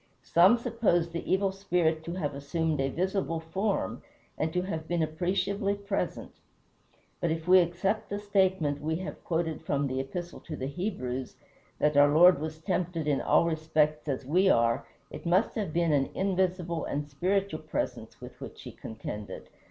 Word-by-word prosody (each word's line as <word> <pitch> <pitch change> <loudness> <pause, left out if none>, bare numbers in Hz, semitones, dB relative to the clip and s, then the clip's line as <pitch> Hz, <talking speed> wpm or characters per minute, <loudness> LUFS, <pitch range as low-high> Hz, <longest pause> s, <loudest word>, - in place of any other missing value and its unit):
Some 185 +8 +5
suppose 225 -8 +1
the 170 - -4
Evil 195 0 +2
Spirit 175 -5 0
to 170 - -4
have 155 -6 -2
assumed 150 +2 -1
a 135 - +1
visible 185 +1 -1
form, 190 - -2 0.3
and 155 +1 -1
to 180 +2 0
have 160 -4 -4
been 175 -2 +1
appreciably 195 +5 0
present. 200 0 -3 0.9
But 170 - 0
if 160 +1 -3
we 185 +1 +8
accept 185 +5 0
the 200 - -2
statement 190 -8 +1
we 160 +2 -1
have 185 +3 -6
quoted 165 -1 -1
from 140 0 0
the 130 -1 -2
Epistle 175 +6 -5
to 160 - -7
the 130 - -4
Hebrews, 135 -6 -3 0.4
that 150 0 +2
our 145 0 +7
Lord 175 +1 +7
was 155 +1 -4
tempted 170 -2 -2
in 145 -2 +2
all - - +4
respects 155 -2 +1
as 135 -2 -2
we 185 +7 +3
are, 115 -6 +2 0.2
it - - -7
must 185 +6 +3
have 205 -7 -2
been 170 -1 +2
an 135 -2 +2
invisible 185 -3 0
and 145 +1 -3
spiritual 180 +3 -1
presence 155 - -4
with - - -11
which - - -9
he - - -8
contended. 105 -3 -7
170 Hz, 170 wpm, -29 LUFS, 150-190 Hz, 0.9 s, we